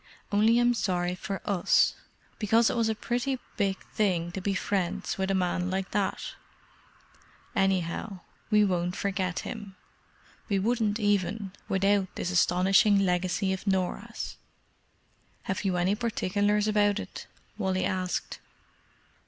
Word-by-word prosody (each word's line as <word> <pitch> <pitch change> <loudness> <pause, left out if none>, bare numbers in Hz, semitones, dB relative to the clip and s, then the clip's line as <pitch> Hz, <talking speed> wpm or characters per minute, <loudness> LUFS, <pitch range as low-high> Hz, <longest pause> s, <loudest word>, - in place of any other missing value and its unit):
"Only 215 +3 +4
I'm 240 0 +4
sorry 180 -5 0
for 195 +1 -5
us, 195 -4 +3 0.5
because 225 +2 +3
it - - -3
was 230 -2 +2
a 220 - 0
pretty 245 +4 -1 0.2
big 195 -3 0 0.2
thing 175 -5 +1
to 190 - -5
be 195 +1 -1
friends 195 -2 -1
with 190 0 0
a 195 - +2
man 180 -1 0
like 190 0 -2
that. 200 -1 -1 1.2
Anyhow, 190 +1 0 0.3
we 210 -1 +5
won't 180 -1 0
forget 190 -3 -1
him. 205 -4 -7 0.7
We 200 - +2
wouldn't 220 +1 +1
even 205 -1 0 0.2
without 195 0 +1
this 180 - -2
astonishing 190 +3 +4
legacy 185 0 +1
of 190 +2 -6
Norah's." 190 -2 -2 1.1
"Have 190 +2 -3
you 185 -3 0
any 180 +3 +2
particulars 210 -2 0
about 205 -1 +3
it?" - - -8 0.3
Wally 190 -2 0
asked. 185 -1 -2
195 Hz, 130 wpm, -28 LUFS, 185-210 Hz, 1.2 s, we